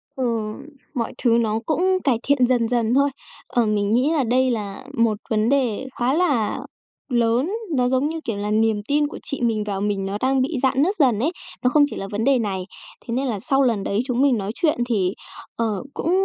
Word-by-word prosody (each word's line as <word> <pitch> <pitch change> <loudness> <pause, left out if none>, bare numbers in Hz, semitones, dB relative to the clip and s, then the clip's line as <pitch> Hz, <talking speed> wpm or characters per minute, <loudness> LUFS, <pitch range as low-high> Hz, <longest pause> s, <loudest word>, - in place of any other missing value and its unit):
Ừ, 265 - -2 0.7
mọi 235 -5 -2
thứ 235 -1 +4
nó 220 -1 0
cũng 315 +2 0 0.2
cải 260 -5 +2
thiện 270 -3 +3
dần 245 -3 +2
dần 235 -1 +1
thôi. 280 +2 +4 0.4
Ờ, 240 -2 +1
mình 205 -1 0
nghĩ 255 +7 +3
là 295 -5 +2
đây 255 +2 +2
là 205 -4 -4
một 230 -2 +2
vấn 220 +1 +2
đề 265 -3 +1
khá 245 +2 +2
là 285 -10 +1 0.5
lớn, 240 +6 +1 0.2
nó, 250 -1 +2
giống 260 +3 +1
như 325 - -4
kiểu, 225 -3 -2
là 205 +1 -2
niềm 220 -1 +2
tin 295 +1 +2
của - - -8
chị 280 - -5
mình 225 -3 +1
vào 200 -2 -3
mình 200 -1 -1
nó 195 +1 -2
đang 265 0 +2
bị 275 +2 -1
rạn 265 0 +3
nứt 390 +5 +1
dần 245 -7 +4
ấy, 295 +8 +1 0.3
nó 250 - +4
không 290 +2 +5
chỉ - - -7
là 195 - -5
vấn 210 +2 -2
đề 270 -1 +3
này. 195 -4 -2 0.4
Thế 230 - -4
nên 265 +3 0
là 220 -5 -2
sau 270 +7 +1
lần 225 -6 +1
đấy 200 +2 -1
chúng 250 -1 0
mình 270 -5 +4
nói 200 0 -3
chuyện 315 -4 +1
thì, 195 -6 +1 0.4
ờ, 220 -3 -1
cũng 335 - -1
240 Hz, 225 wpm, -22 LUFS, 215-270 Hz, 0.7 s, không